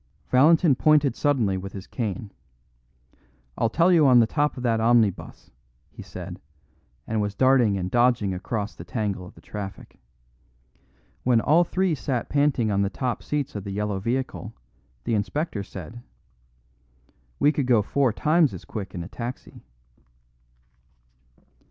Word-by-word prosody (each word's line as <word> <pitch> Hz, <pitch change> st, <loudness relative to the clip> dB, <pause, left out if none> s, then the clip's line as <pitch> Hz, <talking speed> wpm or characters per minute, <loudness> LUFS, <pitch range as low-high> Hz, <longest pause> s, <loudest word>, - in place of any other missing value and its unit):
Valentin 155 Hz, +4 st, +5 dB
pointed 145 Hz, -1 st, +3 dB
suddenly 120 Hz, -10 st, +1 dB
with 95 Hz, +1 st, -7 dB
his 95 Hz, -1 st, -8 dB
cane. 105 Hz, -3 st, -4 dB, 1.2 s
"I'll 115 Hz, -, +1 dB
tell 170 Hz, +9 st, +3 dB
you 160 Hz, -5 st, +5 dB
on 125 Hz, -2 st, +6 dB
the 115 Hz, -, +5 dB
top 145 Hz, +5 st, -1 dB
of 125 Hz, -, -6 dB
that 115 Hz, -2 st, +1 dB
omnibus," 115 Hz, -4 st, +1 dB, 0.4 s
he -, -, -11 dB
said, -, -, -9 dB, 0.6 s
and 110 Hz, -1 st, -1 dB
was 105 Hz, -1 st, -3 dB
darting 130 Hz, -6 st, +3 dB
and 90 Hz, -1 st, -3 dB
dodging 120 Hz, -5 st, +2 dB
across 105 Hz, +3 st, -4 dB
the -, -, -10 dB
tangle 100 Hz, -5 st, -3 dB
of 100 Hz, -, -15 dB
the -, -, -16 dB
traffic. 100 Hz, -2 st, -8 dB, 1.2 s
When 120 Hz, -2 st, +3 dB
all 155 Hz, +8 st, +4 dB
three 185 Hz, 0 st, 0 dB
sank 130 Hz, -4 st, -3 dB
panting 140 Hz, -6 st, +1 dB
on 100 Hz, 0 st, +1 dB
the 100 Hz, -, +1 dB
top 125 Hz, +3 st, -3 dB
seats 150 Hz, -2 st, -3 dB
of 105 Hz, -, -5 dB
the 100 Hz, -, -7 dB
yellow 100 Hz, 0 st, -2 dB
vehicle, 115 Hz, 0 st, -3 dB, 0.5 s
the -, -, -1 dB
inspector 110 Hz, +3 st, -2 dB
said: 100 Hz, +4 st, -9 dB, 1.4 s
"We 145 Hz, -, +4 dB
could 145 Hz, -4 st, -2 dB
go 115 Hz, -4 st, +4 dB
four 135 Hz, +3 st, +1 dB
times 155 Hz, +5 st, +2 dB
as -, -, -10 dB
quick 100 Hz, -5 st, -7 dB
in 85 Hz, -, -4 dB
a -, -, -8 dB
taxi." 120 Hz, +4 st, -8 dB
120 Hz, 150 wpm, -25 LUFS, 100-140 Hz, 1.4 s, on